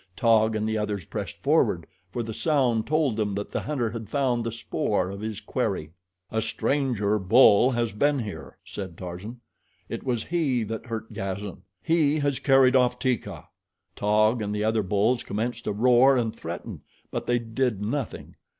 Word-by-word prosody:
Taug 110 -2 +3
and 110 0 -1
the 110 0 0
others 105 -4 -3
pressed - - -5
forward, 85 - +2 0.3
for 120 - -2
the 110 0 -5
sound 125 -6 +1
told 150 -7 +1
them 105 -2 -1
that 100 0 -4
the - - -2
hunter 130 -7 -2
had 115 -2 -7
found 130 -4 +1
the 115 - -2
spoor 105 -4 -1
of 100 +1 -7
his 110 -1 -4
quarry. 105 - -2 0.4
"A 110 - 0
stranger 110 -2 0
bull 110 +3 +6
has 120 -4 -1
been 145 +7 +2
here," 110 -6 -6
said 95 -4 -7
Tarzan. 95 +7 -7 0.5
"It - - -4
was 120 -4 -1
he 145 -9 0
that 110 +2 -5
hurt 115 -1 -5
Gazan. 95 -1 -5 0.2
He 155 -2 +3
has 140 -3 0
carried 135 -2 +5
off 125 -1 +3
Teeka." 125 -1 -2 0.5
Taug 110 +3 +2
and 105 0 -2
the 105 - -1
other 110 0 +2
bulls 105 +5 +1
commenced 115 +2 -3
to - - 0
roar 125 +5 +5
and 115 -3 -1
threaten; - - -7 0.3
but - - -4
they 120 - +3
did 115 -1 -1
nothing. 125 +4 -4
115 Hz, 175 wpm, -26 LUFS, 105-125 Hz, 0.5 s, bull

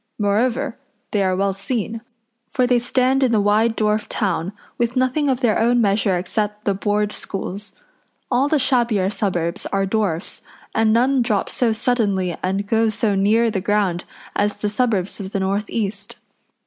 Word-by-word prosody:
Moreover, 230 +5 0 0.3
they 205 - +1
are 185 -1 +1
well 195 +1 +1
seen, 225 +3 -3 0.5
for 255 - +1
they 245 -1 +3
stand 255 +2 +1
in 260 -3 +3
the 220 - +3
wide 215 +3 +2
dwarf 215 0 +1
town, 185 -3 -1 0.3
with 240 +1 0
nothing 260 +3 +1
of 260 -1 0
their 230 -5 +2
own 240 +2 +3
measure 200 -3 +2
except 210 +3 -3
the 200 - +2
Board 205 +1 0
Schools. 195 0 -5 0.6
All 260 +3 +3
the 305 - +2
shabbier 235 -7 +2
suburbs 175 -5 -1
are 195 -1 0
dwarfs, 195 -4 -1 0.3
and 220 -1 +3
none 255 +4 +3
drop 220 -4 0
so 240 -3 +1
suddenly 205 -6 0
and 195 +2 -1
go 225 +2 +2
so 215 -1 +1
near 220 +4 +3
the 195 -3 -2
ground 195 -4 0 0.3
as 205 0 +1
the 210 - -2
suburbs 210 -4 -1
of 195 0 -7
the 195 - 0
north 200 +2 -1
east. 205 0 -3
210 Hz, 170 wpm, -21 LUFS, 195-235 Hz, 0.6 s, they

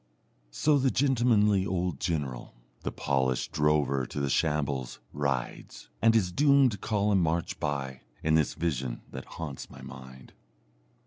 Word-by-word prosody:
So 145 - +2
the 135 0 +3
gentlemanly 115 -6 +3
old 90 -6 -2
general 70 -9 -3 0.3
the - - -3
polished 65 -2 0
drover 75 -4 +1
to - - -5
the 70 -1 0
shambles 70 -6 0
rides, 70 -4 -3
and 115 0 +5
his 95 -5 +2
doomed 140 -2 +4
column 105 -2 +2
march 85 0 -1
by, 70 -3 -3 0.2
in 80 - +2
this 80 -2 +2
vision 65 -7 -2
that - - -7
haunts 75 -5 -6
my - - -12
mind. 65 0 -11
75 Hz, 135 wpm, -29 LUFS, 65-105 Hz, 0.3 s, and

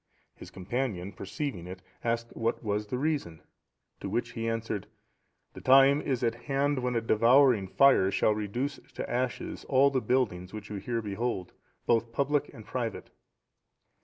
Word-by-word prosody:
His - - -12
companion, 100 -1 -3
perceiving 100 - -5
it, 90 0 -9 0.2
asked 115 0 -2
what 115 +2 -1
was 105 0 -1
the 125 - -2
reason, 135 - -2 0.6
to 100 - -5
which 115 +3 -2
he 115 -1 -3
answered: 115 -3 -3 0.7
"The - - -10
time 135 +2 +6
is 130 -3 -2
at 115 -1 +2
hand 140 +3 -1
when 125 -1 -1
a 115 - +2
devouring 115 -1 +4
fire 135 -3 +5
shall 105 +2 +2
reduce 110 +7 -3 0.2
to - - -4
ashes 125 +1 -3
all 140 +1 +4
the 130 -2 0
buildings 105 -7 0
which 105 -1 -8
you 105 - -3
here 115 +3 -3
behold, 105 -2 -3 0.3
both 115 0 +2
public 140 +4 0
and 110 - -12
private." 115 -4 -4
115 Hz, 160 wpm, -29 LUFS, 105-130 Hz, 0.7 s, time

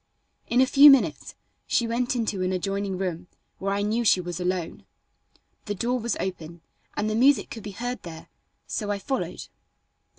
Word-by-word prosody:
In 245 +2 +3
a - - +6
few 280 +3 +8
minutes 200 - +2 0.3
she 235 - +1
went 245 +2 -1
into 215 -5 -1
an 185 0 0
adjoining 195 +1 -2
room 180 -2 -4 0.3
where 195 +1 -2
I 200 +1 0
knew 220 +3 0
she 205 - +4
was 175 -1 -5
alone. 180 -2 -3 0.8
The 205 - -3
door 245 +6 -1
was 235 +1 -2
open 170 -3 -5 0.4
and 210 - 0
the 215 - -1
music 265 +5 +3
could 225 - -7
be 210 - -7
heard 245 +1 -4
there, 160 -2 -10 0.4
so 210 -2 -4
I 205 - 0
followed. 265 +7 -4
205 Hz, 175 wpm, -25 LUFS, 185-240 Hz, 0.8 s, few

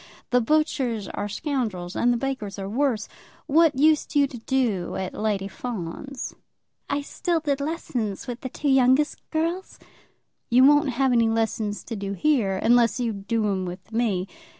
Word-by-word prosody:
The 250 0 +4
butchers 250 -6 0
are 205 0 -4
scoundrels, 210 - -3
and 245 - +3
the 240 - +1
bakers 235 -6 -3
are 195 -1 -4
worse. 230 -1 0 0.4
What 315 0 +4
used 305 +2 +3
you 285 -1 +5
to 255 -3 -8
do 225 -7 0
at 190 -1 -3
Lady 205 -2 -1
Fawn's?" 235 +5 -6 0.6
"I 285 +1 0
still 335 +4 -1
did 285 -3 -1
lessons 250 - -3
with 245 -1 -6
the 260 - -4
two 290 +3 -2
youngest 265 +2 +3
girls." 335 +4 -2 0.7
"You 250 +2 +6
won't 290 +1 +6
have 260 +1 +1
any 230 -2 +4
lessons 220 -2 -1
to 230 - -6
do 200 -1 -4
here, 215 -5 +1
unless 240 +1 +4
you 235 -2 0
do 210 +2 -1
'em 195 -2 0
with 180 +5 -8
me. 220 -6 0
240 Hz, 165 wpm, -25 LUFS, 210-280 Hz, 0.7 s, You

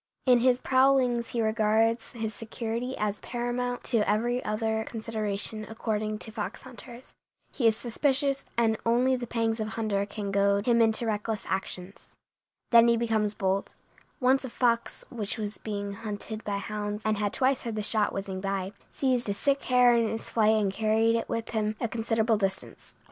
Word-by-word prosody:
In 250 -2 +6
his 250 0 +4
prowlings 260 -2 +3
he 235 -2 -1
regards 220 +1 +1
his 220 -2 -4
security 230 +3 -4
as 210 -1 -1
paramount 245 +1 -3
to 240 - +2
every 240 +4 +1
other 220 +1 -1
consideration, 220 -1 -2
according 215 -1 -2
to 220 - -6
fox 215 -1 -5
hunters. 250 -1 -12 0.4
He 240 -5 +2
is 220 -1 +3
suspicious, 275 +3 0
and 225 -2 +2
only 245 +3 +3
the 245 -1 -5
pangs 225 -1 -1
of 215 - -2
hunger 215 -3 -1
can 205 -1 -5
goad 200 +1 +2
him 235 -1 +4
into 225 +1 +2
reckless 215 -1 -2
actions. 190 0 -5 0.5
Then 235 -1 +7
he 235 0 +4
becomes 220 -3 0
bold. 195 -1 -1 0.4
Once 265 +1 +3
a 260 - -5
fox, 235 -1 0
which 220 -2 -3
was 210 -1 -5
being 205 -2 -4
hunted 215 +1 -5
by 205 -1 -2
hounds 210 +1 -4
and 215 -1 +1
had 205 -1 0
twice 260 0 +1
heard 230 -3 -4
the 215 - -2
shot 215 0 +1
whizzing 195 -1 -4
by, 195 -1 -2 0.2
seized 250 -5 0
a 200 - 0
sick 280 +5 0
hare 250 -1 +5
in 230 -1 +2
his 225 - -5
flight 220 -1 +4
and 205 -3 +1
carried 225 +2 +2
it 230 - -2
with 230 0 -3
him 215 -1 -1
a 235 - 0
considerable 225 0 +1
distance. 195 -2 -4
225 Hz, 175 wpm, -28 LUFS, 210-240 Hz, 0.5 s, Then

